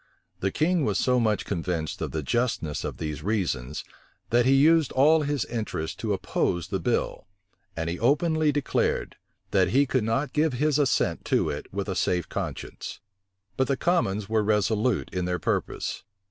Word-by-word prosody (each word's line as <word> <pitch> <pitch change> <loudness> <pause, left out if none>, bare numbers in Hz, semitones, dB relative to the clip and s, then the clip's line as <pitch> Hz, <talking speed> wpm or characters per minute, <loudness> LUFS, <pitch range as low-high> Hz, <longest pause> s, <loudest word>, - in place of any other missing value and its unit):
The 95 - 0
king 165 - +1
was 105 -6 +1
so 125 -1 +2
much 110 -3 +1
convinced 85 -3 -3
of - - -2
the 80 -1 -3
justness 115 - -1
of - - -4
these 75 -2 -4
reasons, 80 - -2 0.5
that 120 +1 +4
he 135 - +5
used 155 +1 +5
all 155 +4 +5
his 145 -3 -1
interest 110 -9 -4
to 110 - -2
oppose 85 -3 -1
the - - -1
bill; - - -1 0.5
and 80 0 -2
he 85 +1 -3
openly 155 +4 +2
declared, 145 -2 0 0.4
that 95 -2 +4
he 135 +9 +3
could 130 -3 0
not 125 +5 -1
give 155 -1 +2
his 150 +3 +1
assent 140 -4 +1
to - - +1
it 70 - -7
with 100 0 -3
a 95 - -1
safe 90 -1 0
conscience. - - -5 0.6
But 130 - +2
the 140 - 0
commons 105 - +1
were 110 0 +2
resolute 105 +2 +1
in 90 -1 -1
their 90 0 0
purpose. - - -2
115 Hz, 175 wpm, -26 LUFS, 90-140 Hz, 0.6 s, he